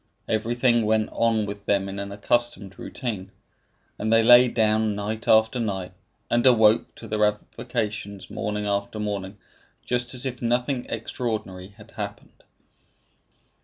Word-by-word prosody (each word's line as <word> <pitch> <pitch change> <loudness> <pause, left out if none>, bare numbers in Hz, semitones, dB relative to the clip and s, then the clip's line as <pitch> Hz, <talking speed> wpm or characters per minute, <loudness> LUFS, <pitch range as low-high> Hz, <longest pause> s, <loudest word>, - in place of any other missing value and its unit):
Everything 120 +2 +2
went 110 0 +2
on 115 -2 +1
with 100 0 -8
them 100 -1 +1
in 100 +1 -5
an 100 0 -5
accustomed 105 -1 -1
routine; 105 -7 -5 0.7
and 110 +1 -1
they 115 0 +5
lay 120 +2 +8
down 110 -2 +1
night 105 +2 -4
after 110 +3 +4
night, 95 -5 -3 0.4
and 120 0 +2
awoke 110 -3 +4
to 115 - -10
their 105 0 0
avocations 105 -1 -3
morning 105 0 -3
after 100 +1 -2
morning, 100 -1 -4 0.5
just 125 +1 -2
as 125 - -2
if 125 -2 -4
nothing 125 +2 0
extraordinary 110 -5 -4
had 110 0 -15
occurred. 105 -3 -8
110 Hz, 135 wpm, -24 LUFS, 105-120 Hz, 0.7 s, lay